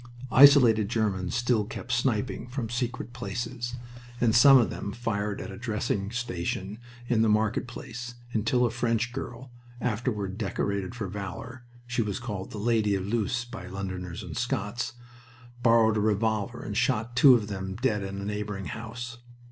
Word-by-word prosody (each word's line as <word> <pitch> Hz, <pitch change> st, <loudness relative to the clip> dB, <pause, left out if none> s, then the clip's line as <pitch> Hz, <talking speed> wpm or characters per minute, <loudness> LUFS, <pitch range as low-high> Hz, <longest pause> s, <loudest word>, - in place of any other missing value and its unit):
Isolated 125 Hz, -7 st, +7 dB
Germans 100 Hz, -5 st, 0 dB
still 120 Hz, -2 st, +2 dB
kept 120 Hz, +3 st, -7 dB
sniping 120 Hz, 0 st, 0 dB
from 120 Hz, -3 st, -4 dB
secret 120 Hz, 0 st, -3 dB
places, 120 Hz, 0 st, -4 dB, 0.4 s
and 115 Hz, -2 st, +3 dB
some 135 Hz, +3 st, +9 dB
of 120 Hz, -, +3 dB
them 100 Hz, -, -5 dB
fired 105 Hz, -4 st, -2 dB
at -, -, -6 dB
a 95 Hz, -, -8 dB
dressing 105 Hz, -4 st, -1 dB
station 105 Hz, -3 st, -3 dB, 0.3 s
in 120 Hz, -2 st, +2 dB
the 110 Hz, -, +4 dB
market 110 Hz, +3 st, +1 dB
place, 120 Hz, 0 st, -7 dB, 0.2 s
until 115 Hz, +3 st, +2 dB
a 120 Hz, -, 0 dB
French 120 Hz, 0 st, 0 dB
girl, 125 Hz, +1 st, -6 dB, 0.3 s
afterward 110 Hz, -5 st, -2 dB
decorated 100 Hz, -1 st, -2 dB
for 110 Hz, -5 st, -3 dB
valor 110 Hz, +6 st, -7 dB, 0.2 s
she 120 Hz, 0 st, -1 dB
was 105 Hz, -3 st, -2 dB
called 100 Hz, -5 st, -5 dB
the -, -, -7 dB
Lady 105 Hz, -2 st, +2 dB
of 95 Hz, -1 st, -2 dB
Loos 115 Hz, +3 st, -1 dB
by 115 Hz, -7 st, -8 dB
Londoners 95 Hz, 0 st, -5 dB
and 85 Hz, -4 st, -7 dB
Scots 120 Hz, -1 st, -2 dB, 0.7 s
borrowed 115 Hz, -2 st, +5 dB
a -, -, +2 dB
revolver 105 Hz, -1 st, 0 dB
and -, -, -5 dB
shot 115 Hz, +3 st, 0 dB
two 130 Hz, 0 st, +8 dB
of 110 Hz, -3 st, -1 dB
them 95 Hz, -2 st, -4 dB
dead 105 Hz, -1 st, 0 dB
in 100 Hz, 0 st, -5 dB
a 100 Hz, -, -5 dB
neighboring 105 Hz, -1 st, -3 dB
house. 120 Hz, +3 st, -6 dB
110 Hz, 165 wpm, -28 LUFS, 100-120 Hz, 0.7 s, some